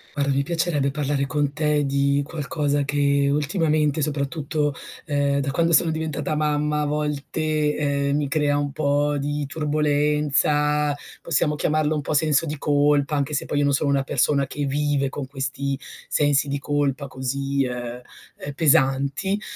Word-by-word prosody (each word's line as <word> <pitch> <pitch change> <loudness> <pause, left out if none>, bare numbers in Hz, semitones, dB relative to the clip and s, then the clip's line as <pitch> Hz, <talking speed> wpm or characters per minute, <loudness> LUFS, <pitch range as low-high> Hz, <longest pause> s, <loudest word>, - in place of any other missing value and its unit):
Guarda 140 -1 0
mi 140 0 +1
piacerebbe 160 -3 0
parlare 140 -1 -1
con 145 0 -1
te 150 -1 0
di 140 +1 +1
qualcosa 145 -1 -2
che 140 0 +1
ultimamente, 150 0 +1
soprattutto, 145 0 -2 0.3
ehm, 140 -2 0
da 140 0 -2
quando 165 +4 +1
sono 165 +1 +6
diventata 160 -1 -3
mamma, 150 0 0
a - - -1
volte, 150 +1 -1
ehm, 140 -1 0
mi 145 -1 -1
crea 145 -1 +1
un 145 -1 -2
po' 145 0 0
di 145 +1 -2
turbolenza, 150 0 +1 0.3
possiamo 165 -2 +2
chiamarlo 155 +1 0
un 150 - -1
po' 145 - -3
senso 155 +1 +3
di 150 0 -4
colpa, 145 0 +2
anche 140 +1 -1
se 145 - 0
poi 145 - -2
io 145 - +2
non 140 - +2
sono 140 +1 +1
una 140 -1 +2
persona 140 +1 +1
che 145 +2 -4
vive 140 0 0
con 135 0 -6
questi 135 0 -2 0.3
sensi 145 -1 +2
di 140 +1 -2
colpa 145 -1 -1
così, 135 +1 -1
ehm 125 -1 -5 0.4
ehm, 145 - -6
pesanti. 140 +6 +2
145 Hz, 160 wpm, -23 LUFS, 140-150 Hz, 0.4 s, sono